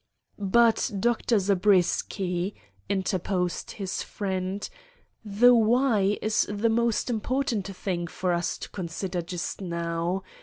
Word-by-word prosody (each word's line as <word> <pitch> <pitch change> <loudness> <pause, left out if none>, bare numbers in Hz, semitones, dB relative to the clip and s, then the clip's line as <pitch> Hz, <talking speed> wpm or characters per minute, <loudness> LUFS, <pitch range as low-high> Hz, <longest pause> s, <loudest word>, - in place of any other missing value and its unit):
"But, 225 +5 +3
Dr. 235 +1 +2
Zabriskie," 190 -1 +1 0.3
interposed 185 -2 -1
his 195 -2 -4
friend, 190 -1 -3 0.6
"the 225 +4 +5
why 225 -3 +3
is 215 0 +2
the 205 +3 +1
most 235 0 +1
important 235 -2 -1
thing 180 -3 -3
for 180 +2 -1
us 170 0 -1
to - - -8
consider 180 0 -3
just 175 +3 -5
now. 170 +1 -2
195 Hz, 110 wpm, -27 LUFS, 180-220 Hz, 0.6 s, the